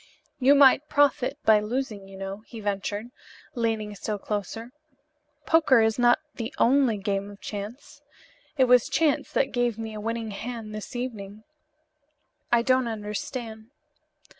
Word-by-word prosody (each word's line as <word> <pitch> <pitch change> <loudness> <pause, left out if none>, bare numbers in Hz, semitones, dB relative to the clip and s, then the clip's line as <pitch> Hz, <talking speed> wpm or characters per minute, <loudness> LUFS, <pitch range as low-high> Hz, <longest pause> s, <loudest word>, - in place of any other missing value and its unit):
"You 275 +2 +6
might 280 +1 +5
profit 285 -1 +2
by 215 -1 +6
losing, 215 -2 -4
you 195 0 -11
know," 195 +1 -5
he 230 - -9
ventured, 205 +2 -3 0.4
leaning 225 -4 -1
still 205 +1 -4
closer, 210 +4 -5 0.7
"Poker 295 -8 +5
is 220 +2 +1
not 240 0 +5 0.2
the 230 -2 -5
only 255 -3 +3
game 200 0 -2
of 200 -1 -12
chance. 210 +5 -8 0.6
It 265 - +5
was 250 -1 +4
chance 300 -3 +1
that 270 - +1
gave 245 -3 0
me 225 -1 -5
a 210 - -6
winning 225 0 -3
hand 225 +1 -6
this 215 +3 -7
evening." 215 -4 -6 1.1
"I 235 -1 +4
don't 255 -1 +2
understand." 220 +1 -5
225 Hz, 140 wpm, -26 LUFS, 210-250 Hz, 1.1 s, You